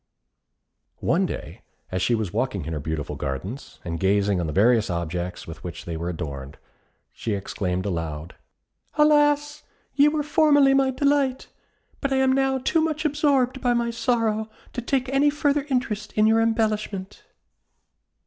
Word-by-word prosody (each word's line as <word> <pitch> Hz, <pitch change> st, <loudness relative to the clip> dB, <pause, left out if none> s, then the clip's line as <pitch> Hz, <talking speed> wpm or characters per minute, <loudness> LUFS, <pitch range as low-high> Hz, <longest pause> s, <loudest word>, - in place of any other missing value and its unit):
One -, -, +1 dB
day, -, -, -7 dB, 0.3 s
as 95 Hz, -1 st, -1 dB
she 120 Hz, -, +2 dB
was 110 Hz, -5 st, -3 dB
walking -, -, -1 dB
in 80 Hz, -, -4 dB
her 75 Hz, -, -2 dB
beautiful 75 Hz, 0 st, -4 dB
gardens, 75 Hz, -, -5 dB
and 85 Hz, -1 st, -3 dB
gazing 100 Hz, 0 st, +2 dB
on 85 Hz, -, -2 dB
the -, -, -3 dB
various 110 Hz, +4 st, +3 dB
objects 85 Hz, +1 st, -3 dB
with 80 Hz, -1 st, -10 dB
which 85 Hz, -1 st, -7 dB
they 85 Hz, -, -4 dB
were 85 Hz, +2 st, -3 dB
adorned, 70 Hz, -5 st, -6 dB, 0.6 s
she 110 Hz, -3 st, -3 dB
exclaimed 95 Hz, -1 st, -3 dB
aloud, 80 Hz, -3 st, -4 dB, 0.6 s
"Alas! 295 Hz, 0 st, +3 dB, 0.3 s
ye 285 Hz, +1 st, +5 dB
were 300 Hz, 0 st, +1 dB
formerly 290 Hz, -2 st, +4 dB
my 270 Hz, -1 st, +3 dB
delight; 275 Hz, -1 st, +1 dB, 0.5 s
but 280 Hz, -, -2 dB
I -, -, +2 dB
am 265 Hz, 0 st, +3 dB
now 270 Hz, 0 st, +2 dB
too 320 Hz, +5 st, +1 dB
much 310 Hz, -1 st, -1 dB
absorbed 275 Hz, -4 st, +2 dB
by 245 Hz, -1 st, +2 dB
my 235 Hz, 0 st, 0 dB
sorrow 230 Hz, -3 st, 0 dB, 0.2 s
to 245 Hz, -, -3 dB
take 260 Hz, +2 st, 0 dB
any 275 Hz, +2 st, +3 dB
further 290 Hz, -1 st, 0 dB
interest 215 Hz, -5 st, -2 dB
in 215 Hz, -, +3 dB
your 225 Hz, +1 st, +4 dB
embellishment." 215 Hz, -4 st, -1 dB
220 Hz, 160 wpm, -24 LUFS, -, 0.6 s, ye